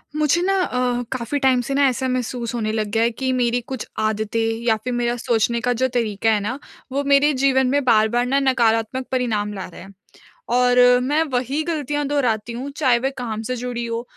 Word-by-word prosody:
मुझे 305 +3 +2
ना 385 +2 +1
अ, 250 -4 -1
काफ़ी 255 +2 -2
टाइम 260 -2 +3
से 260 +3 -4
ना, 280 0 +4
ऐसा 260 +1 -2
महसूस 250 -2 -3
होने 215 -2 -1
लग 215 -1 -1
गया 225 +1 +2
है 235 - +2
कि 260 +3 -2
मेरी 245 -1 +1
कुछ 260 -4 -5
आदतें 215 +1 -1 0.3
या 225 -2 +3
फिर 250 - -3
मेरा 240 0 0
सोचने 235 -1 0
का 245 +1 +1
जो 260 - +4
तरीका 225 -2 0
है 215 - +2
ना, 230 +7 -4 0.3
वो 280 +2 -1
मेरे 280 +1 +4
जीवन 265 -1 +3
में 285 +2 +1
बार-बार 235 +1 +3
ना 270 +2 +1
नकारात्मक 255 -2 +1
परिणाम 215 -5 -1
ला 190 - -6
रहा 175 - -12
है। 190 - -12 0.7
और 250 0 +3 0.2
मैं 295 +4 +1
वही 260 +5 0
गलतियाँ 295 -3 -2
दोहराती 240 -6 -1
हूँ, 260 +4 -5
चाहे 255 -5 +3
वे 270 +3 -1
काम 225 -3 -4
से 255 - -1
जुड़ी 240 -1 -4
हों, 230 0 -3
245 Hz, 210 wpm, -21 LUFS, 230-265 Hz, 0.7 s, ना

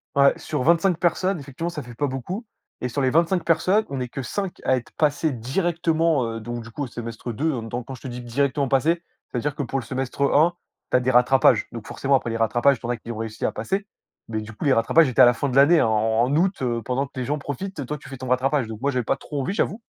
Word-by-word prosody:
Ouais, 140 0 +6
sur - - -3
25 170 +3 +3
personnes, 185 +1 +1
effectivement, 140 +5 -5
ça 150 -3 -5
fait 120 -2 -11
pas 145 - 0
beaucoup 160 - -4 0.4
et 125 - -1
sur 140 - -2
les 130 - +3
25 170 +5 +2
personnes, 185 +6 +3
on 135 - -3
est 125 -1 -3
que 135 - -5
5 195 +7 -4
à 130 - +3
être 125 -2 -6
passés 150 +1 +2
directement, 160 +3 +1
heu, - - -4
donc 120 +1 -5
du 115 - -11
coup, 145 +6 -5
au 135 - -3
semestre 115 0 -6
2. 155 +9 0
Heu, 125 -5 -3
donc 120 +1 -4
quand 135 - -6
je - - -15
te - - -7
dis: 125 0 -6
«directement 140 +3 0
passer», 155 +6 +2 0.3
c'est-à-dire 135 +3 -2
que 145 - -2
pour 135 +2 -2
le 125 - -8
semestre 130 +2 -4
1, 160 +4 +5 0.4
tu - - +5
as - - +3
des 125 +1 -1
rattrapages. 125 +1 +4
Donc 115 -2 -8
forcément, 140 0 -1
après 130 -3 0
les 115 - -2
rattrapages, 120 +4 +3
tu - - -9
en 120 - -3
as 120 - 0
qui 115 +1 -8
ont 110 - -6
réussi 110 0 -5
à - - +1
passer. 195 +1 -2 0.4
Mais 110 -1 -3
du 105 - -9
coup, 110 - -6
les 140 - +5
rattrapages 140 +7 +4
étaient 125 - +3
à 125 - +10
la 120 - +6
fin 140 +5 -2
de 125 - -3
l'année, 145 +5 +6
hein, - - +3
en 110 +1 +2
en 135 +3 0
août, 185 +2 +1
heu, 120 -2 -1
pendant 130 +5 -1
que 130 - -9
les, 125 - -2
gens 145 +4 -1
profitent 150 +7 -5
et 140 - -3
toi, 150 - -3
tu 140 - -14
fais 135 - -7
ton 130 0 -7
rattrapage. 130 +1 +1
Donc 110 +1 -8
moi, 140 +1 +1
j'avais 125 -2 -1
pas - - +1
trop 145 +1 -6
envie, 160 - -2
j'avoue. 210 +1 -1
135 Hz, 285 wpm, -23 LUFS, 120-155 Hz, 0.4 s, à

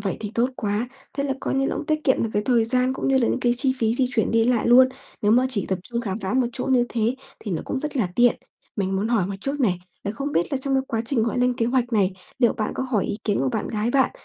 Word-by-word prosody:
vậy 195 -3 -2
thì 210 -2 -4
tốt 240 +3 +2
quá. 210 +3 -1 0.2
Thế 280 +1 -2
là 275 - 0
coi - - -2
như 270 0 +1
là - - -2
cũng 305 - -5
tiết 310 -1 0
kiệm 260 - +3
được 225 - -1
cái 210 - +1
thời 240 -3 +3
gian 255 +2 +2
cũng - - -2
như 270 -1 +4
là 235 - +2
những - - 0
cái 240 -1 +3
chi 260 +1 +2
phí 225 -1 +1
di 255 0 +2
chuyển 225 -3 +1
đi 225 0 +3
lại 240 -2 +2
luôn. 255 +2 +7 0.3
Nếu 205 - +4
mà 250 +3 +4
chỉ 215 -6 -1
tập 190 - 0
trung 235 +4 -3
khám 205 -3 -3
phá 195 +1 -3
một 255 -1 +3
chỗ 250 - -3
như 255 -2 +3
thế 230 +1 0 0.2
thì 205 - -5
nó 165 - -2
cũng 265 - -3
rất 300 -1 -3
là 220 -8 +1
tiện. 240 0 +5 0.4
Mình 195 -2 -1
muốn 205 +3 -1
hỏi 225 -6 +2
một 200 - -4
chút 275 +5 -3
này, 185 -8 +2 0.3
là 200 - -1
không 280 +5 -4
biết 175 - 0
là 275 - +1
trong 270 0 -1
cái 265 - +2
quá 225 -1 -1
trình, 235 -2 0
gọi 235 +2 -1
lên 250 0 +2
kế 230 - +1
hoạch 245 -1 0
này, 195 -3 +2 0.3
liệu 240 -3 +4
bạn 215 - -3
có - - -2
hỏi 250 -6 0
ý 210 - -3
kiến 205 -2 +1
của 135 - +1
bạn - - -2
gái 215 +2 -1
bạn 265 0 +3
240 Hz, 310 wpm, -23 LUFS, 210-260 Hz, 0.4 s, luôn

